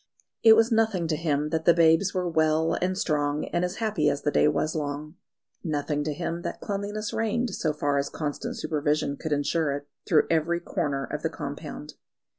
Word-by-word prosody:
It 225 -1 +8
was 225 +2 +4
nothing 220 -6 +2
to 155 - +1
him 150 -2 0
that 160 0 -2
the 170 - +6
babes 165 +3 +4
were 180 -2 -1
well 160 -1 +2
and 185 +1 0
strong, 150 -3 0
and 175 - +1
as 180 +1 -2
happy 210 -10 +1
as 140 0 -2
the 145 - +1
day - - +4
was 150 +1 0
long; 150 0 -4 0.5
nothing 150 -2 -1
to 155 - -1
him 170 0 -3
that - - -5
cleanliness 205 +1 -4
reigned, 225 +1 0
so 155 - 0
far 145 -1 0
as 140 - -2
constant 150 -2 -4
supervision 150 -1 0
could 160 - -6
ensure 145 +1 +1
it, 145 0 -6 0.2
through 155 -4 +4
every 165 +1 +1
corner 140 -5 -2
of 150 - -5
the 160 - 0
compound. 150 0 -7
160 Hz, 195 wpm, -26 LUFS, 150-180 Hz, 0.5 s, It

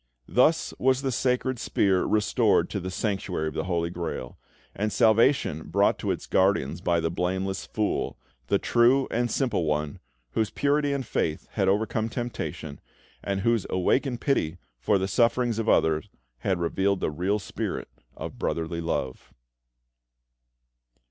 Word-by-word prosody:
Thus 155 +6 +3
was 130 +1 +2
the 135 - 0
sacred 125 0 0
spear 95 -4 +2
restored 105 -1 +2
to - - -2
the 95 - -5
Sanctuary 95 -4 -2
of - - -10
the 80 - -2
Holy 85 -2 -1
Grail, 85 -8 -5 0.4
and 105 +1 -1
salvation 110 - +3
brought - - +2
to - - -3
its - - -2
guardians 95 -6 +1
by 85 -1 +2
the 80 0 -1
"Blameless 95 +2 -2
Fool," 105 -1 -1 0.3
the - - +3
true 125 +3 +3
and 120 +1 0
simple 115 - 0
one, 75 -1 -1 0.3
whose 110 - 0
purity 145 +4 +1
and 140 -2 -2
faith 80 -1 -2
had 95 -3 0
overcome 110 +3 +1
temptation, 115 - -5 0.4
and 100 -1 -1
whose 115 -1 +1
awakened 120 +7 +1
pity 85 - 0 0.2
for 100 - +2
the 95 0 -1
sufferings 115 +2 +2
of 115 - 0
others 80 -1 +2 0.3
had 95 +7 0
revealed 95 +3 +1
the - - -1
real 90 +7 0
spirit 105 - -4 0.3
of - - -7
brotherly 85 0 -2
love. 65 -6 -3
100 Hz, 150 wpm, -26 LUFS, 85-120 Hz, 0.4 s, Thus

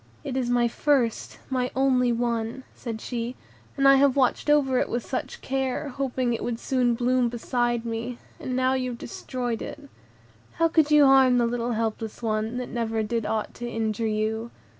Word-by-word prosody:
"It 275 -3 -4
is 255 -2 0
my 240 -1 +3
first, 245 -2 0
my 255 -1 0
only 255 -2 +3
one," 235 +1 -1
said 225 -3 -6
she, 235 +1 -4 0.4
"and 275 0 +4
I 275 0 +8
have 275 -1 +4
watched 265 +2 +1
over 270 -4 +4
it - - 0
with 240 0 -2
such 260 - -4
care, 270 +2 -2
hoping 255 -2 -1
it 230 - -3
would 235 -1 -2
soon 250 -2 +1
bloom 245 0 +2
beside 240 0 -1
me; 230 +1 -4 0.2
and 255 - -3
now 260 0 +2
you 255 -1 -1
have 240 - -6
destroyed 245 -1 -4
it. - - -6 0.7
How 330 - +3
could 315 -2 +3
you 300 -1 +7
harm 265 -2 +6
the 240 - +3
little 240 0 -1
helpless 225 0 -3
one, 220 +1 -1
that 250 - -4
never 225 -2 -1
did 225 0 -2
aught 220 -1 -2
to 240 0 -6
injure 225 -1 -1
you?" 220 +2 -1
245 Hz, 185 wpm, -26 LUFS, 230-260 Hz, 0.7 s, I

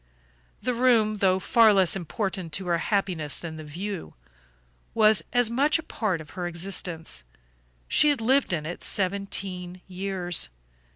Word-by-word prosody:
The 250 - 0
room, 230 -3 +3
though 190 -2 +3
far 225 +3 +5
less 190 -2 +3
important 190 -1 -3
to 190 - 0
her 170 -1 +1
happiness 175 -7 -1
than 160 -2 -7
the 155 - -8
view, 165 - -6 0.8
was 215 -2 +5
as 245 -2 +2
much 280 +7 +3
a 325 - -7
part 210 - -2
of 150 -2 -11
her 175 +3 -4
existence. 170 - -3 0.6
She 300 - +5
had 290 -4 +1
lived 260 +3 +2
in 155 -4 -1
it 170 +3 -6
seventeen 185 -2 -1
years. 185 - -1
190 Hz, 150 wpm, -26 LUFS, 175-220 Hz, 0.8 s, far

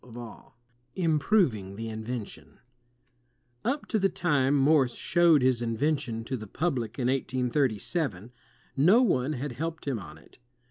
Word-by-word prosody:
MORSE 120 -2 -11 0.4
221 170 -3 +1
Improving 140 - +1
the 115 +2 -5
Invention 110 0 -7 1.0
Up 275 +5 -1
to 220 - 0
the 195 0 +2
time 145 -7 +1
Morse 135 -3 +3
showed 170 -5 +3
his 130 -2 +2
invention 120 -1 -1
to 130 +3 -4
the 110 -3 -7
public 125 - -2
in 130 - -1
1837, 125 - -1 0.4
no 185 - +5
one 135 - +1
had 140 +1 -4
helped 160 +5 -5
him 130 -5 -1
on 80 -5 -11
it. - - -21
130 Hz, 140 wpm, -28 LUFS, 115-155 Hz, 1.0 s, no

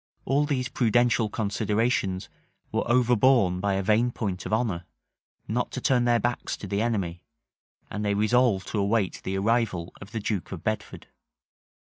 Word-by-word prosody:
All 140 +3 +2
these 130 -4 0
prudential 120 -2 +2
considerations 105 -2 0 0.4
were - - +1
overborne 120 -5 +4
by 100 0 0
a 95 - -1
vain 110 +5 +3
point 100 -6 -4
of - - -7
honor, 105 -6 0 0.6
not - - -1
to - - -3
turn 125 -2 +2
their 120 -1 +3
backs 120 +1 -2
to - - -8
the 100 +1 -1
enemy; 95 -7 -2 0.7
and 105 - -3
they 100 -1 +1
resolved 110 -2 +2
to 105 - -1
await 100 -1 0
the 95 +1 -2
arrival 105 -5 0
of 100 0 -10
the 115 - -3
duke 100 -4 -3
of 90 -4 -7
Bedford. 110 -1 -3
110 Hz, 160 wpm, -26 LUFS, 100-120 Hz, 0.7 s, overborne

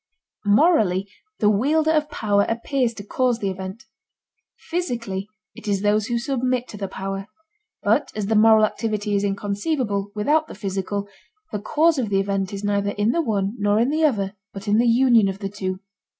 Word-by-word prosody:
Morally 205 - +3 0.3
the 210 - +2
wielder 305 +9 +2
of 305 -1 +1
power 205 -2 +1
appears 240 +2 0
to 205 - -8
cause 245 +3 0
the 200 -4 -2
event; 190 +3 -7 0.7
physically 235 - -3 0.2
it - - -12
is 200 -1 0
those 210 +1 +2
who 240 -2 0
submit 255 0 -1
to - - -9
the 200 -1 -4
power. 195 +1 -5 0.6
But - - +2
as 210 -2 -2
the 220 - 0
moral 220 0 +6
activity 210 -1 -2
is 200 - +1
inconceivable 205 +1 -1
without 300 +9 +2
the - - -9
physical, 200 0 -3 0.4
the 210 - -2
cause 305 +8 +2
of 230 -5 -1
the 195 -1 +2
event 195 0 -1
is 200 0 -6
neither 200 0 0
in 210 +2 +2
the 335 - +1
one 205 -7 -1
nor 205 0 +2
in 240 +5 +2
the 315 +1 +1
other 205 -9 +1 0.2
but 195 +1 -8
in 210 +2 +3
the 240 - +3
union 235 -3 +5
of 195 0 -3
the 195 -1 -4
two. 190 -2 -4
210 Hz, 185 wpm, -23 LUFS, 200-245 Hz, 0.7 s, moral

